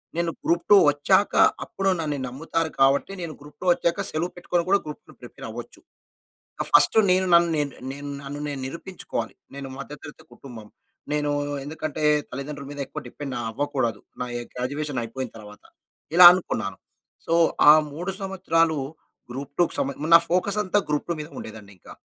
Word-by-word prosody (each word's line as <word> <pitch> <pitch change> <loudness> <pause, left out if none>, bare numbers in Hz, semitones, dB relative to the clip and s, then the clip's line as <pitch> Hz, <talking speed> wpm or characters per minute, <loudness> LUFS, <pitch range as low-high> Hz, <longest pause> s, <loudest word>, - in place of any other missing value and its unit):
నేను 170 -1 0
group 170 0 +1
two 205 - +9
వచ్చాక 190 +8 +2 0.3
అప్పుడు 195 0 -2
నన్నీ 150 -3 -2
నమ్ముతారు. 160 +5 -2
కాబట్టి 135 +7 +3
నేను 165 -2 -5
గ్రూప్ 145 0 -15
టూ - - -6
వచ్చాక 170 +3 0
సెలవు 170 +3 -2
పెట్టుకొని 175 0 -1
కూడా 200 0 +4
గ్రూప్ 150 +8 -8
టూ - - -15
ప్రిపేర్ - - -11
అవ్వచ్చు. - - -9 0.8
ఆ - - +1
ఫస్టు 220 - +7
నేను 185 +1 +3
నన్ను 170 0 +6
నేను, 145 -1 -1 0.2
నేను 145 +1 -7
నన్ను 145 +1 -7
నేను 140 -2 -5
నిరూపించుకోవాలి. 170 +6 -6 0.2
నేను 140 -1 -6
మధ్య 140 +2 -8
తరగతి 150 -1 -12
కుటుంబం. 115 -6 -12 0.4
నేను 150 -1 0 0.3
ఎందుకంటే 155 +1 -5 0.3
తల్లిదండ్రుల 140 +1 -7
మీద 145 - -8
ఎక్కువ - - -7
డిపెండ్ 135 +1 -7 0.2
అవ్వకూడదు, 130 -4 -2 0.2
నా 125 - -2
ఏ - - -4
గ్రాడ్యుయేషన్ 140 +2 -3
అయిపోయిన 125 +2 -5
తరువాత. 105 -1 -13 0.5
ఇలా 180 0 +10
అనుకున్నాను. 110 - -3 0.5
సో 165 - -1 0.4
ఆ - - +12 0.2
3 175 +5 -4
సంవత్సరాలు 165 -5 +1 0.5
గ్రూప్ 140 +2 -7
టూ‌కు 175 - +3
సమే 140 - -1
మరి 160 +2 -2
నా - - +10
ఫోకస్ 195 +4 +1
అంతా 205 +3 +1
గ్రూప్ 150 -1 -1
టూ - - +1
మీద 150 - -6
ఉండేదండి 110 -2 -10
ఇంకా. - - -14
150 Hz, 170 wpm, -24 LUFS, 135-170 Hz, 0.8 s, ఆ